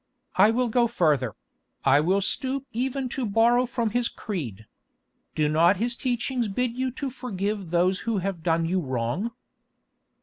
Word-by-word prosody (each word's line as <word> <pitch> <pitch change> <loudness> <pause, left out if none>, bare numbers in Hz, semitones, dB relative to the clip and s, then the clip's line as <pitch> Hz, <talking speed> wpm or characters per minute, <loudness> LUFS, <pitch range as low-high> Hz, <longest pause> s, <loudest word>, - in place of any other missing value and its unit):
I 200 +3 +6
will 245 +2 +1
go 235 +1 +3
further; 150 - +1 0.5
I 135 +1 +6
will 185 +6 +2
stoop 265 +6 -1
even 260 +3 -2
to 265 - -3
borrow 235 +3 +3
from 235 -2 -1
His 240 +1 0
creed. 125 - -5 0.7
Do 155 -1 +2
not 165 +5 +4
His 235 +4 -1
teachings 245 -1 -1
bid 240 +4 -1
you 260 +1 -1
to 270 0 -4
forgive 205 -6 -3
those 180 +3 +2
who 230 -2 -1
have 190 -2 -3
done 165 0 +1
you 185 +3 +1
wrong?" 130 - -2
210 Hz, 160 wpm, -26 LUFS, 170-245 Hz, 0.7 s, I